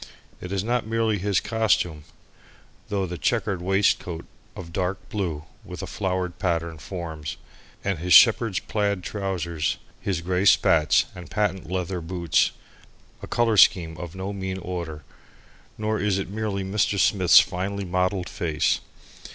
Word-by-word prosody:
It 90 - -7
is 100 -1 -1
not 120 0 -1
merely 110 -2 0
his 100 0 +1
costume, 95 -9 0 0.8
though 100 -2 0
the 90 -1 -6
chequered 105 -6 0
waistcoat 90 -3 +1 0.3
of 85 -2 -9
dark 95 +1 -3
blue 85 -8 -3 0.2
with - - -8
a - - -2
flowered 90 -2 -3
pattern 85 -4 -1
forms, 80 -4 -6 0.5
with 95 -4 -1
his 90 +2 -4
shepherd's 115 -3 +7
plaid 100 -3 -1
trousers, 85 -6 -2 0.2
his 95 -5 -2
grey 90 +2 0
spats 80 -5 +4
and 90 -1 -10
patent 95 -5 -1
leather 90 -1 -2
boots, 85 -4 +1 0.7
a - - -7
colour 115 -2 +1
scheme 85 -4 +5
of 85 0 -7
no 95 +2 -4
mean 95 -1 -4
order. 85 -5 -5 0.7
Nor 110 0 -1
is 100 -1 +1
it 95 -1 -4
merely 105 -2 -2
Mr. 100 +1 0
Smith's 95 -2 +6
finely 95 +2 -2
mottled 90 +1 0
face. 85 -7 0
95 Hz, 145 wpm, -25 LUFS, 85-100 Hz, 0.8 s, shepherd's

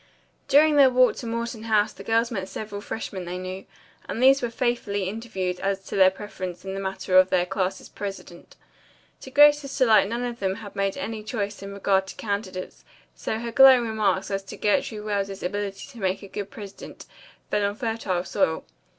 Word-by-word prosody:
During 295 +2 +5
their 275 -2 +8
walk 255 0 +4
to 240 - -6
Morton 230 0 -4
House 215 -1 +2
the - - -11
girls 230 +1 +1
met 190 -4 -4
several 205 +1 -6
freshmen 200 -4 -5
they 175 +1 -4
knew, 185 +1 -6 0.4
and - - -3
these 270 +2 +6
were 240 - -1
faithfully 230 -4 -1
interviewed 190 -4 -3
as 195 0 -1
to - - -7
their 190 -1 +7
preference 185 -2 -7
in 190 - -4
the 195 - -4
matter 190 -1 +2
of 185 0 +3
19 185 +1 +1
's 190 - -13
president. 195 -4 -8 0.6
To - - -10
Grace's 290 0 +5
delight 220 -5 +5
none 235 +2 -2
of 240 -1 -4
them 190 -1 -1
had 205 -2 -10
made 195 0 -1
any 215 +2 -4
choice 205 -2 -4
in 200 0 -7
regard 195 -1 +1
to - - -8
candidates, 200 -3 -5 0.3
so 220 - -3
her 235 +1 -5
glowing 260 -1 +7
remarks 210 -3 0
as 195 0 -1
to - - -9
Gertrude 210 +1 0
Wells's 200 -2 -2
ability 200 +1 -4
to 245 -4 -12
make 190 0 -1
a - - -8
good 200 +1 -6
president 200 -2 -10 0.5
fell 210 - +1
on 200 0 0
fertile 220 -6 -2
soil. 175 -3 0
205 Hz, 195 wpm, -25 LUFS, 190-230 Hz, 0.6 s, their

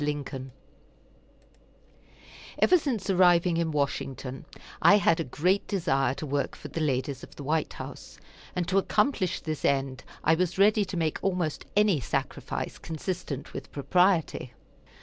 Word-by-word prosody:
LINCOLN 145 -3 -3 2.1
Ever 360 - +5
since 245 -10 -2
arriving 180 -2 +4
in 165 -1 +1
Washington 135 -3 -3 0.4
I 205 - +7
had 200 -5 +3
a - - +1
great 180 +9 0
desire 135 -9 +1
to 155 - -5
work 140 0 -1
for - - -9
the 165 - -4
ladies 135 -2 -1
of - - -12
the 145 - -8
White 155 +3 0
House, - - -9 0.4
and 175 -2 -1
to 195 +1 +3
accomplish 210 -2 +1
this 155 -2 -4
end 135 -2 0 0.2
I 160 - +4
was 180 +2 0
ready 205 +1 +4
to 185 -1 -5
make 160 -2 0
almost 180 -5 -1
any 205 -6 +4
sacrifice 125 - -3
consistent 160 -3 -5
with - - -7
propriety. 170 -4 +1
165 Hz, 145 wpm, -28 LUFS, 140-185 Hz, 2.1 s, I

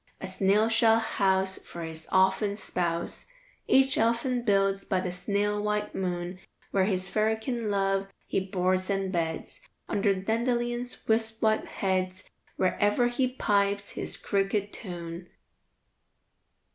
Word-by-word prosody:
A - - -5
snail 200 +3 +2
shell 225 0 +4
house 190 -4 +1
for 170 - -8
his 160 0 -8
ouphen 190 +2 +3
spouse 170 -4 -3 0.4
Each 265 0 +4
elfin 235 +2 +1
builds 195 -3 +2
by 190 - 0
the 180 -1 -2
snail 205 +3 -1
white 210 0 -1
moon, 180 -1 -3 0.3
Where 190 -1 +3
his 185 -2 -1
fairykin 220 +3 0
love 195 -1 +1 0.2
he - - 0
boards 185 0 0
and 195 -1 0
beds, 165 -3 -3 0.3
Under 200 0 +2
the 190 -1 -1
dandelion's 240 +3 -1
wisp 225 0 0
white 220 0 +2
heads, 185 0 -1 0.3
Where 185 - 0
ever 210 +4 +3
he 255 +2 +1
pipes 200 -5 0
his - - -6
cricket 200 +1 0
tune." 175 -3 -7
200 Hz, 135 wpm, -28 LUFS, 185-220 Hz, 0.4 s, shell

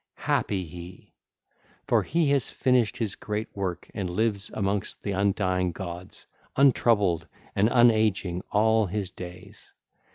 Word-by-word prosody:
Happy 95 -3 0
he! 85 +2 -11 0.7
For - - +3
he 165 -1 +1
has 140 -4 +1
finished 125 -4 +1
his 110 -4 -2
great 105 +1 -4
works 95 -3 -4
and 95 -3 -3
lives 100 +2 0
amongst 100 -1 -2
the 100 - -2
undying 95 -2 +1
gods, 90 0 -7 0.3
untroubled 105 - +3 0.3
and 105 +3 +3
unageing 110 -7 +3
all 110 0 +3
his 95 0 -3
days. 90 0 -11
100 Hz, 125 wpm, -26 LUFS, 90-110 Hz, 0.7 s, For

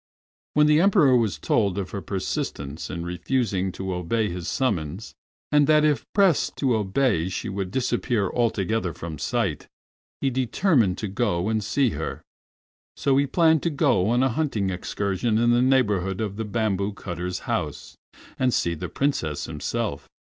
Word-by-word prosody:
When 150 0 +5
the 150 +1 +5
Emperor 180 -9 +5
was 110 -9 +1
told 100 +4 +1
of 95 -2 -3
her 100 - -4
persistence 80 -6 -4
in 85 -1 -5
refusing 95 +1 -1
to 95 -1 -4
obey 105 +5 -1
his 85 -1 -5
summons, 100 - -2 0.4
and 150 -1 +4
that 155 0 +5
if 150 -2 +1
pressed 195 -7 +3
to 130 -3 +1
obey 105 -4 +1
she 100 +4 -4
would 95 -1 -3
disappear 120 -2 0
altogether 110 -5 0
from 80 -3 -7
sight, 70 - -1 0.5
he 135 - 0
determined 125 - +2
to 105 - -3
go 100 -2 0
and 110 -1 0
see 125 +4 +1
her. - - -5 0.7
So 135 - +2
he 140 0 +2
planned 160 +1 +3
to 170 - 0
go 135 - +2
on 120 +2 +3
a 135 - +3
hunting 115 -8 -1
excursion 100 +4 -1
in 120 +1 +3
the 120 +1 +4
neighborhood 105 -8 +2
of 105 -3 -3
the 110 +1 -3
bamboo 105 -2 -1
cutter's 90 -1 -5
house, - - -4 0.4
and 130 -1 +2
see 85 -7 +1
the 85 +2 -5
Princess 85 - -1
himself. - - -4
110 Hz, 160 wpm, -24 LUFS, 95-130 Hz, 0.7 s, When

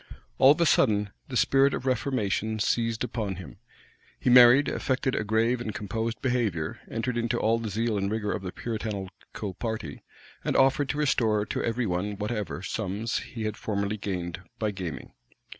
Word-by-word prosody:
All 135 +2 +8
of 155 - -10
a - - +5
sudden, 105 -9 +3 0.2
the 125 - -2
spirit 135 +2 +4
of - - -6
reformation 110 -4 0
seized 115 +2 0
him; 95 - -4 0.6
he 125 - +2
married, 125 +3 +8
affected 130 0 -1
a - - 0
grave 115 +3 +1
and 110 -3 -4
composed 110 +3 -3
behavior 115 - -1
entered 120 +1 -2
into 120 0 0
all 115 0 +2
the 115 -1 -4
zeal 110 +1 0
and 100 0 -1
rigor 105 -1 -1
of - - -2
the 90 -2 -5
Puritanical 105 -3 -5
party, 110 -11 -4 0.4
and - - -1
offered 135 +1 +3
to 145 - -1
restore 110 -8 +2
to - - -3
every 120 +1 0
one 100 +2 -2
whatever 105 -3 -3
sums 105 +3 -2
he 115 -3 -7
had 110 -1 -2
formerly 100 0 -2
gained 90 -3 -4 0.2
by 110 -1 -1
gaming. 95 -5 -6
110 Hz, 170 wpm, -27 LUFS, 100-120 Hz, 0.6 s, All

